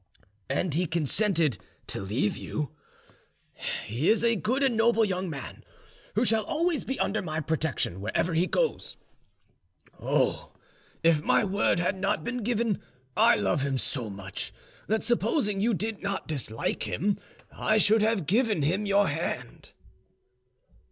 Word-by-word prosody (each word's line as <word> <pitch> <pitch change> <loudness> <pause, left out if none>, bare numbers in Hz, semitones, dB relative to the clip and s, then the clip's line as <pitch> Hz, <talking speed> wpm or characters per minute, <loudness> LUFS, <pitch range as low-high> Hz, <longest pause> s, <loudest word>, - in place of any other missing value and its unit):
"And 175 -5 0
he 175 +3 +1
consented 165 - +2 0.3
to - - -5
leave 105 +2 0
you? 150 -2 -4 1.1
He 120 +9 0
is 225 +1 +3
a 230 -1 +4
good 250 - 0
and 260 -4 +3
noble 225 0 +4
young 185 -2 -2
man, 140 -4 -7 0.5
who 225 +4 +3
shall 220 -1 +2
always 330 0 0
be 265 - -3
under 215 - 0
my 155 -3 -3
protection 155 - -1
wherever 110 - 0
he 170 +3 +2
goes. - - -1 1.0
Oh, - - 0 0.5
if 165 -2 +4
my - - +3
word 200 -3 +2
had 175 +3 +1
not 195 +2 0
been 250 +1 -3
given, 230 -2 0 0.3
I - - +6
love 100 +5 +1
him 135 -1 0
so 125 -3 -2
much 95 -1 -6 0.4
that, 220 +2 +1
supposing 220 - +1
you 225 +1 +2
did 215 +1 -3
not 200 -1 -3
dislike 125 -7 -2
him, 200 +3 0 0.3
I 215 - +1
should 215 +1 +5
have 215 -5 +1
given 210 - +2
him 190 +8 +1
your 200 0 +4
hand." 160 +3 -4
195 Hz, 145 wpm, -28 LUFS, 150-220 Hz, 1.1 s, I